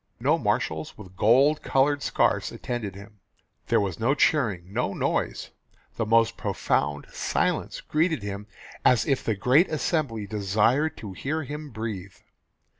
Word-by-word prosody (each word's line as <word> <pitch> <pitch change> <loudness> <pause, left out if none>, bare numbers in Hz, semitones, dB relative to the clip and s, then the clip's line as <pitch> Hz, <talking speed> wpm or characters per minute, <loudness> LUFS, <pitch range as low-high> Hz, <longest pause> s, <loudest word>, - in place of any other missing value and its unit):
No - - +2
marshals 80 -1 -1
with 95 -3 -12
gold 135 +10 +4
coloured 140 +2 +2
scarfs - - +1
attended 110 -6 -5
him; 100 +1 -13 0.5
there - - +3
was 95 -4 -2
no 130 +5 +2
cheering, 100 - +1
no 120 -4 -1
noise; - - -2 0.4
the 115 - -2
most 115 +1 +3
profound 75 0 -1
silence - - -1
greeted 160 - 0
him 100 0 -5 0.4
as 125 - +4
if 135 -4 0
the 110 - 0
great 130 - +4
assembly 145 - -1
desired 110 +9 +1
to 100 -3 -7
hear 155 - -3
him 150 +2 -7
breathe. 105 -5 -6
115 Hz, 140 wpm, -26 LUFS, 100-145 Hz, 0.5 s, gold